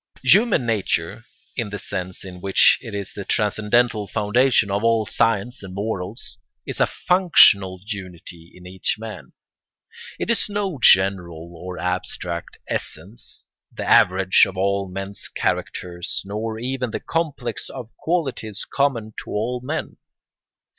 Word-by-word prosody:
] - - -26
Human 210 - +2
nature, 110 -4 -1 0.3
in 115 - -2
the 105 - -5
sense 95 -2 -5
in 90 -1 -9
which 95 0 +5
it 115 -5 -7
is 100 -2 -4
the 100 - -6
transcendental 105 +1 +1
foundation 110 +1 +2
of 100 +2 0
all 115 -1 +3
science 115 +4 0
and 95 -1 -9
morals, 100 0 -4 0.3
is - - -5
a - - +4
functional 105 - +5
unity 90 -5 -8
in 90 - -14
each 90 0 -2
man; 105 - -9 0.9
it - - -1
is 230 - +1
no 200 -7 -2
general 85 -5 +3
or 90 +2 -7
abstract 90 -1 -3
essence, 95 +9 -6 0.3
the - - -6
average 95 0 +5
of 95 - -8
all 100 0 0
men's 95 +2 -6
characters, 85 -1 -3
nor 110 +2 -4
even 125 +1 -2
the - - -3
complex 145 -8 -3
of 115 - -8
the - - -40
qualities 135 - -2
common 120 -6 -1
to - - -13
all 120 +4 -2
men. 145 +6 -4
105 Hz, 140 wpm, -22 LUFS, 95-120 Hz, 0.9 s, which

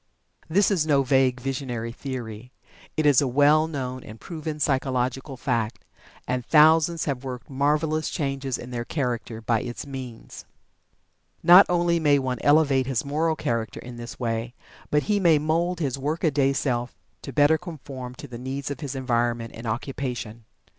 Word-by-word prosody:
This 200 +6 +3
is 165 -6 +1
no 140 -3 +4
vague, 130 -1 +2
visionary 125 -3 -3
theory. 125 -2 -7 0.5
It 155 - +1
is 145 -3 +6
a 140 - +1
well 145 +4 +4
known 130 -4 -5
and 110 +1 -11
proven 155 -3 -6
psychological 130 -1 -1
fact, 120 -3 -2 0.4
and 125 0 -1
thousands 160 +3 +4
have 135 -3 -2
worked 130 0 -7
marvelous 150 +3 +1
changes 135 -4 -2
in 125 - -9
their 120 -1 -3
character 120 -4 -3
by 115 0 +1
its 120 +2 -6
means. 130 -4 -8 1.0
Not 180 +3 +9
only 175 -1 +2
may 145 -3 +4
one 130 -3 -2
elevate 145 -3 +4
his 135 0 -1
moral 160 +3 0
character 115 -6 -2
in 120 -1 -9
this 120 0 -8
way, 115 0 -2 0.3
but 150 0 +2
he 210 -1 +1
may 170 -5 +5
mould 165 +4 0
his 140 -4 -2
"work 150 +5 -2
a 160 - +3
day" 140 -1 +2
self 125 -3 -1 0.3
to - - -7
better 145 +4 +4
conform 135 -7 -8
to 145 - -9
the 120 -2 -8
needs 135 +2 -4
of 140 - -5
his 145 -3 -5
environment 120 -3 -1
and 115 +1 -8
occupation. 120 -1 -4
135 Hz, 165 wpm, -25 LUFS, 125-150 Hz, 1.0 s, Not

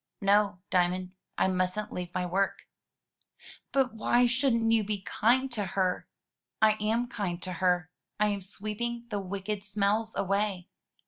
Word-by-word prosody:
"No, 200 -1 +3
Diamond; 180 0 +1 0.3
I - - +3
mustn't 185 +3 -1
leave 180 -1 -4
my 180 0 -1
work." 190 +2 -1 1.0
"But 265 -4 +2
why 240 +2 +3
shouldn't 240 -2 +2
you 225 -1 +4
be 205 -1 -2
kind 260 +7 +2
to 220 -3 -1
her?" 185 -1 +1 0.5
"I 220 0 +6
am 225 +3 +1
kind 200 -8 -3
to 185 - -3
her; 180 -2 +2 0.3
I 210 - +4
am 200 -1 -2
sweeping 215 +5 -4
the 205 - -1
wicked 195 +1 -4
smells 210 +2 0
away." 195 -2 0
205 Hz, 145 wpm, -29 LUFS, 185-225 Hz, 1.0 s, I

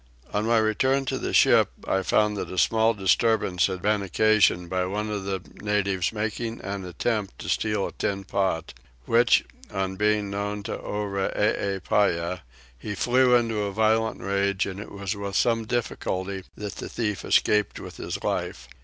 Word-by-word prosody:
On 105 +2 0
my 115 0 +4
return 130 +5 +2
to - - -2
the - - -3
ship - - +5 0.2
I 95 - +1
found 105 +2 +2
that 100 - -4
a 95 - -6
small 110 +4 +3
disturbance 95 -1 +2
had 95 -2 -5
been 105 0 +2
occasioned 100 -2 +3
by 90 +1 -1
one 105 +3 -3
of 100 -2 -3
the 95 -2 -2 0.2
natives 100 -3 0
making 110 +1 -3
an 95 -1 -5
attempt 100 +3 -2
to - - -8
steal 105 -2 0
a - - -5
tin 100 -1 -2
pot; 95 -5 -1 0.3
which, 120 +1 +4 0.2
on 95 -1 -3
being 105 -1 +1
known 100 +1 -3
to - - -4
Oreepyah, 100 -3 0 0.4
he 105 +8 -5
flew 125 +4 +4
into 115 -3 +1
a 100 -1 -2
violent 110 +2 +1
rage, 100 0 0
and 100 0 -6
it 105 - -8
was 100 +1 -4
with 100 -1 -5
some 115 0 +2
difficulty 100 -5 -3
that 105 -2 -6
the - - -6
thief 105 -5 -2
escaped 105 -1 +2
with - - -9
his - - -5
life. - - -3
105 Hz, 170 wpm, -25 LUFS, 95-110 Hz, 0.4 s, ship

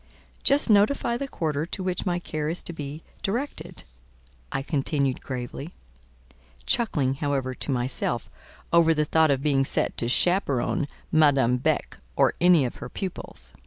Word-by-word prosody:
"Just 280 +1 +5
notify 225 +3 +3
the 275 +3 -3
quarter 155 - -2
to 185 +3 -4
which 185 +1 -2
my 175 -1 +1
care 155 -3 -3
is 170 - -1
to 170 - -5
be 150 0 -7 0.2
directed," 245 +9 -3 0.7
I 135 - -2
continued 140 -2 -1
gravely: 130 +5 -6 0.9
chuckling, 165 - +2
however, 135 -2 -2
to 130 - -6
myself 120 -2 -1 0.5
over 165 -1 +5
the 150 0 +1
thought 160 +1 +3
of 140 -1 +1
being 140 -3 +3
set - - -1
to 115 - 0
chaperon 155 -1 +2 0.2
Madame 140 -6 +4
Beck 125 - -1 0.2
or - - +3
any 175 -5 +5
of 120 - -5
her - - -7
pupils. 145 - -7
150 Hz, 150 wpm, -25 LUFS, 135-180 Hz, 0.9 s, Just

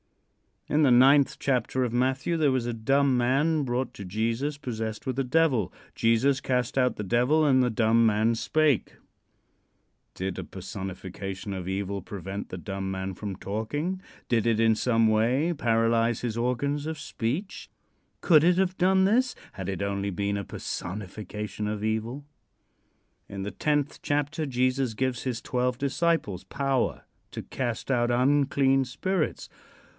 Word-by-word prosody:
In 150 +1 +2
the 140 - +5
ninth 135 +3 +5
chapter 130 -1 0
of 120 -2 -2
Matthew 130 +6 +1
there 150 -4 +3
was 130 -2 0
a 120 - -2
dumb 135 +4 +2
man 140 +6 +2
brought 125 0 -2
to 100 - -8
Jesus, 115 +9 -1
possessed 110 -5 -5
with 130 0 -2
a - - +2
devil. 130 - +2 0.2
Jesus 120 +4 +3
cast 125 -1 -1
out 125 -1 +2
the 105 - -4
devil 125 +10 +2
and 130 -3 +4
the 125 - +2
dumb 115 0 +3
man 110 +1 +3
spake. 150 +2 +1 1.2
Did 95 -1 -3
a - - -4
personification 95 +1 -6
of 90 -2 -5
evil 100 +1 -2
prevent 95 +1 -6
the 95 - -6
dumb 95 +1 -4
man 95 0 -3
from 100 +1 -5
talking? 145 - -3 0.3
Did 115 -2 +2
it 115 -1 +2
in 115 0 +5
some 115 0 +2
way 120 +10 +2
paralyze 115 -3 +1
his 115 -2 -3
organs 140 +5 -1
of 160 0 -4
speech? 145 - -4 0.5
Could 155 -4 +5
it 175 +1 +4
have 185 -1 +1
done 190 +1 +4
this 245 +6 +2 0.2
had 95 -2 -6
it 95 0 -3
only 100 0 -2
been 100 +2 -1
a 100 - -4
personification 105 +2 -5
of 105 0 -3
evil? 110 +6 -2 1.0
In 100 -1 -6
the 100 - -4
tenth 145 +7 -1
chapter 145 +2 -1
Jesus 130 -1 0
gives 130 +1 -2
his 125 -3 -3
twelve 125 0 -1
disciples 140 - 0
power 135 -2 -1 0.3
to - - -6
cast 120 0 -3
out 120 -2 +2
unclean 135 +1 +3
spirits. 155 +7 -2
120 Hz, 155 wpm, -27 LUFS, 105-140 Hz, 1.2 s, the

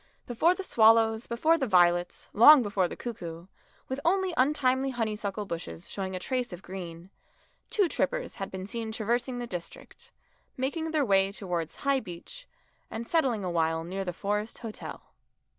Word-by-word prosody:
Before 320 +10 +2
the 390 - -5
swallows, 225 -4 +4
before 315 +8 +2
the 265 - 0
violets, 175 -2 +3
long 265 +5 +9
before 200 -3 +1
the - - -7
cuckoo, 175 -8 -7 0.4
with 260 +1 -3
only 375 +1 +2
untimely 265 -1 +2
honeysuckle 215 -4 -3
bushes 90 - -6
showing 190 -1 -4
a - - -3
trace 250 +3 -2
of 180 +1 -9
green, 175 -1 -8 0.6
two 405 -4 +3
trippers - - -1
had 195 - -3
been 190 0 -6
seen 225 +2 -4
traversing 240 +3 -1
the 245 - -3
district, 175 -7 -9 0.5
making 305 +5 -2
their 310 -3 +1
way 195 -2 +3
towards 175 -5 -4
High 275 -1 +3
Beech, 260 - -10 0.4
and 225 +1 -5
settling 255 - +1
awhile 165 -2 0
near 190 +3 -4
the 180 - -3
Forest 210 +5 -2
Hotel. 225 -3 -8
220 Hz, 160 wpm, -28 LUFS, 185-260 Hz, 0.6 s, long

